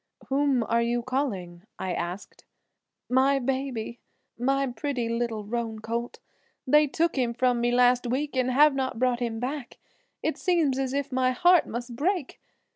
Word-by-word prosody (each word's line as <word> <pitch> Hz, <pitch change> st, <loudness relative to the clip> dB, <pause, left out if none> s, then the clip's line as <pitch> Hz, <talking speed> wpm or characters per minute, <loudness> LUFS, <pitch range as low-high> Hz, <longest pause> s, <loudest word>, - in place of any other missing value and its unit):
"Whom 270 Hz, -3 st, +2 dB
are 230 Hz, +1 st, +1 dB
you 235 Hz, +1 st, 0 dB
calling?" 205 Hz, -10 st, -3 dB, 0.2 s
I 185 Hz, -1 st, -3 dB
asked. 175 Hz, +4 st, -6 dB, 0.6 s
"My 265 Hz, +2 st, +3 dB
baby, 260 Hz, -3 st, -3 dB, 0.4 s
my 275 Hz, +3 st, +1 dB
pretty, 255 Hz, -1 st, -3 dB
little 230 Hz, -2 st, -2 dB
roan 225 Hz, 0 st, -3 dB
colt; 230 Hz, +2 st, -4 dB, 0.5 s
they 300 Hz, +3 st, +5 dB
took 330 Hz, +4 st, 0 dB
him 240 Hz, -2 st, 0 dB
from 245 Hz, -1 st, +2 dB
me 240 Hz, -, +2 dB
last 245 Hz, 0 st, +3 dB
week 275 Hz, +4 st, -2 dB
and 255 Hz, -1 st, +1 dB
have 290 Hz, +3 st, +5 dB
not 265 Hz, -3 st, -2 dB
brought 250 Hz, 0 st, +1 dB
him 230 Hz, -2 st, -2 dB
back. 260 Hz, +1 st, -5 dB, 0.5 s
It -, -, -1 dB
seems 320 Hz, -8 st, +1 dB
as 265 Hz, -1 st, -1 dB
if 280 Hz, 0 st, -2 dB
my 255 Hz, 0 st, +2 dB
heart 350 Hz, +6 st, +4 dB
must 240 Hz, +1 st, -5 dB
break! 335 Hz, +2 st, -1 dB
250 Hz, 160 wpm, -26 LUFS, 235-275 Hz, 0.6 s, they